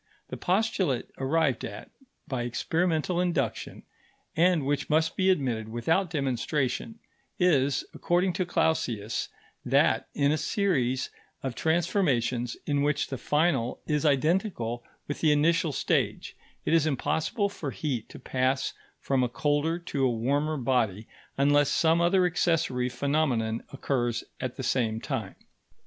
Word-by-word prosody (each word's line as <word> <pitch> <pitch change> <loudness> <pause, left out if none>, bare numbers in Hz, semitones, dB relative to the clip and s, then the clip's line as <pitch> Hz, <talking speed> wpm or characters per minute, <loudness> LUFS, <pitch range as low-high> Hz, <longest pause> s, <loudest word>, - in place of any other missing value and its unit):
The - - -5
postulate 185 - 0
arrived 140 -2 +1
at - - -7 0.4
by 130 -3 -2
experimental 165 +7 0
induction, 180 -1 -2 0.5
and 170 -3 +3
which 145 +1 -1
must 160 +1 +2
be 190 0 +2
admitted 125 - 0
without 160 +11 +1
demonstration, 140 - -1 0.4
is, 145 -8 +2
according 180 +1 +1
to 185 +1 -1
Clausius, 115 -11 0 0.3
that - - +2
in 140 0 +3
a 155 - +1
series 135 - 0 0.3
of 135 -2 -2
transformations 135 - 0
in 145 -1 +1
which 145 0 0
the 135 - -3
final 150 -6 +1
is 150 -2 0
identical 145 - +1 0.2
with 145 - -4
the 155 - +4
initial 165 +2 +3
stage, - - -1 0.3
it - - +1
is 160 -2 +4
impossible 160 - 0
for 170 -7 -5
heat 130 -5 -3
to - - -10
pass 130 +1 0 0.3
from 135 -1 0
a 125 - 0
colder 145 +5 0
to 150 -5 -3
a 130 - +4
warmer 140 +7 0
body 115 -5 0 0.3
unless 145 +1 +4
some 165 +1 +3
other 180 +2 +4
accessory 160 -8 +1
phenomenon 125 -4 0
occurs 125 -4 -1 0.2
at 130 -1 -4
the 130 - -5
same 115 -3 0
time. 115 -7 -4
145 Hz, 135 wpm, -28 LUFS, 125-165 Hz, 0.5 s, the